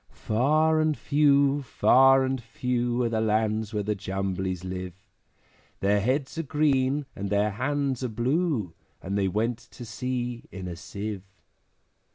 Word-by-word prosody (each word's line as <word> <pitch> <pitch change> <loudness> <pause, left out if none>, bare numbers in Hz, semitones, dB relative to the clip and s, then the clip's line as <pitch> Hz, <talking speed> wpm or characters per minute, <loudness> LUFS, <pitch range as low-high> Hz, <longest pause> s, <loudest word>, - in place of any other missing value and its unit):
Far 155 +8 +3
and 155 -2 +1
few, 140 +2 +3
far 135 +1 +5
and 130 -1 -2
few, 125 -1 -1
Are 120 - +1
the 110 -1 0
lands 110 0 0
where 105 -1 -2
the 105 +1 0
Jumblies 95 -2 -3
live; 90 -1 -5 0.9
Their 100 +1 +2
heads 135 +7 -1
are - - +2
green, 145 -2 +1
and 100 +1 -4
their 105 +1 +2
hands 135 +3 -1
are - - 0
blue, 120 - 0 0.3
And 95 +2 -3
they 100 -1 +1
went 110 +5 -1
to 120 - -12
sea 120 0 -4
in 95 -2 -7
a 85 - -5
Sieve. 100 +3 -6
120 Hz, 150 wpm, -26 LUFS, 100-135 Hz, 0.9 s, far